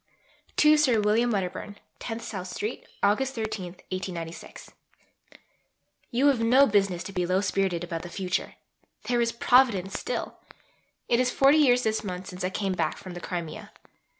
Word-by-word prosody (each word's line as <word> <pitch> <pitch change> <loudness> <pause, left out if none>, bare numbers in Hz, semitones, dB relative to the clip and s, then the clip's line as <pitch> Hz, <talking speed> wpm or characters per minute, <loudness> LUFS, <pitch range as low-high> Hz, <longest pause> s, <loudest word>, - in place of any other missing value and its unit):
(To 305 0 +6
Sir 260 -7 +3
William 215 +3 +2
Wedderburn.) 200 0 -3 0.2
10 225 -1 -5
SOUTH 185 -5 -6
STREET, 210 +5 -5 0.2
August 255 +7 +2
13.... 210 -5 -4 2.3
You 250 +4 +1
have 280 -4 +4
no 250 +5 +5
business 195 -6 +1
to 195 - -8
be 180 -2 -1
low 185 +1 +2
spirited 190 -3 0
about 170 -2 -4
the 175 - -8
future. 185 0 -3 0.5
There 240 -1 +1
is 235 0 +1
Providence 235 -6 +3
still. - - -4 0.7
It 235 - +2
is 255 0 +2
40 275 +4 +4
years 250 -4 +4
this 220 0 0
month 185 -2 -5
since 180 -1 -7
I 185 - 0
came 195 0 -2
back 165 -3 -1
from 185 - -9
the 175 - -8
Crimea. 170 -3 -6
205 Hz, 155 wpm, -27 LUFS, 185-245 Hz, 2.3 s, To